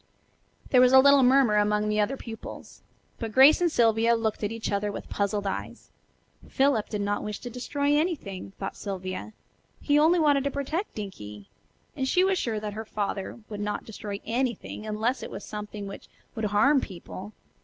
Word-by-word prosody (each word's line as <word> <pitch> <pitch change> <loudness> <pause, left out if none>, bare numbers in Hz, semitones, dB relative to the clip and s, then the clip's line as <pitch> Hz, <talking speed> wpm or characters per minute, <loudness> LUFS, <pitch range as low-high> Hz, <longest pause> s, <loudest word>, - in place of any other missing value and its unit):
There 250 - +6
was 255 0 +5
a 265 - +10
little 280 +1 +7
murmur 255 -4 +4
among 210 0 +2
the 210 0 0
other 235 +6 0
pupils, 225 -3 -9 0.4
but 225 -2 -4
Grace 270 +8 +7
and 345 -2 +2
Sylvia 230 -2 +3
looked 220 -2 -2
at 205 - -1
each 230 -1 -4
other 205 +1 0
with - - -7
puzzled 200 0 -1
eyes. 195 - -5 0.6
Philip 270 -6 +2
did 210 -2 -3
not 205 0 -1
wish 210 -1 -4
to 245 - -7
"destroy" 285 +4 0
anything, 280 - -2
thought 195 - -5
Sylvia; 190 +1 -5 0.5
he 290 0 +3
only 325 +4 +5
wanted 290 -4 +3
to - - +2
protect 285 +8 -3
Dinkie. 105 - -8 0.5
And 265 -2 -1
she 360 +7 +3
was 380 -1 +2
sure 220 -3 -1
that 210 -1 -5
her 220 +2 -5
father 205 0 -4
would 210 -2 -7
not 210 0 -3
destroy 205 -2 -6
anything, 235 -3 -3
unless 220 +5 -1
it - - -6
was - - -8
something 210 -1 -6
which 195 - -9 0.3
would 220 - -3
harm 260 +8 +4
people. 190 +2 -8
220 Hz, 185 wpm, -27 LUFS, 205-270 Hz, 0.6 s, a